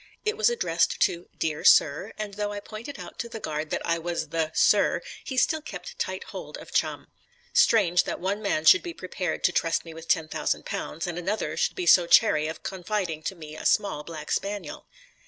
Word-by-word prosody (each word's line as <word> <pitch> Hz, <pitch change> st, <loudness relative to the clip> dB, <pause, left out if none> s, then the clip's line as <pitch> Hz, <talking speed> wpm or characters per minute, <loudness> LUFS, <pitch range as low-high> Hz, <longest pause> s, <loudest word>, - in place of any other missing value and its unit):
It 430 Hz, +1 st, +1 dB
was 445 Hz, +2 st, +3 dB
addressed 475 Hz, 0 st, 0 dB
to 175 Hz, 0 st, +1 dB
"Dear 155 Hz, -1 st, -2 dB
Sir," 145 Hz, -1 st, +5 dB
and 210 Hz, -1 st, -5 dB
though 205 Hz, 0 st, -2 dB
I 205 Hz, -, -4 dB
pointed 225 Hz, +7 st, -8 dB
out -, -, -10 dB
to 235 Hz, -, -4 dB
the 225 Hz, -, -7 dB
guard 155 Hz, -4 st, -4 dB
that -, -, -2 dB
I 170 Hz, 0 st, +1 dB
was 165 Hz, -2 st, -3 dB
the 160 Hz, 0 st, -1 dB
"Sir," -, -, +3 dB, 0.2 s
he 260 Hz, -, -5 dB
still 315 Hz, +4 st, +2 dB
kept -, -, -9 dB
tight 465 Hz, -, -2 dB
hold -, -, -7 dB
of -, -, -12 dB
Chum. -, -, 0 dB, 0.5 s
Strange 180 Hz, -6 st, +4 dB
that -, -, -3 dB
one 195 Hz, +4 st, -2 dB
man 180 Hz, -7 st, 0 dB
should 185 Hz, -, +8 dB
be 340 Hz, -1 st, -7 dB
prepared 185 Hz, 0 st, -4 dB
to -, -, +4 dB
trust 165 Hz, -1 st, 0 dB
me 165 Hz, -, -9 dB
with 165 Hz, +1 st, -11 dB
£10,000, 160 Hz, 0 st, -1 dB
and 175 Hz, -1 st, -4 dB
another 200 Hz, +5 st, -2 dB
should -, -, 0 dB
be 365 Hz, -, -3 dB
so 175 Hz, -, +6 dB
chary 155 Hz, -7 st, +5 dB
of 160 Hz, 0 st, -7 dB
confiding 185 Hz, -4 st, -3 dB
to 190 Hz, -, -4 dB
me 155 Hz, -2 st, -10 dB
a -, -, -8 dB
small 200 Hz, -8 st, +1 dB
black 155 Hz, -2 st, -8 dB
spaniel. 200 Hz, -5 st, -3 dB
180 Hz, 205 wpm, -26 LUFS, 160-215 Hz, 0.5 s, should